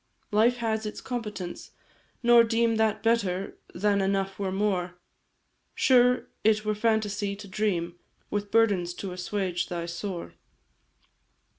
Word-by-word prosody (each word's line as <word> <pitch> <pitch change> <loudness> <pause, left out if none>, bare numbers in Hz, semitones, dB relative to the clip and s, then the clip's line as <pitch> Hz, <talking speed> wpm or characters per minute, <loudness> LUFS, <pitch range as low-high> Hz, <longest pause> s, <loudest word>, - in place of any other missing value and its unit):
"Life 225 +4 +4
has 220 -2 -1
its 210 - -6
competence 210 -8 -6 0.5
nor 240 0 +7
deem 230 0 +1
That 220 -1 +1
better 200 -5 0 0.2
than 200 +2 +2
enough 195 0 -1
were 195 -2 -1
more; 185 -3 -1 0.8
Sure 250 -1 +4 0.2
it 215 0 +3
were 215 - +1
phantasy 210 -2 0
to 205 0 -10
dream 180 -4 -1 0.3
With 205 0 -2
burdens 200 -6 +2
to 190 +1 -5
assuage 180 0 -2
thy 170 -1 -4
sore. 170 +1 -5
205 Hz, 125 wpm, -27 LUFS, 185-220 Hz, 0.8 s, nor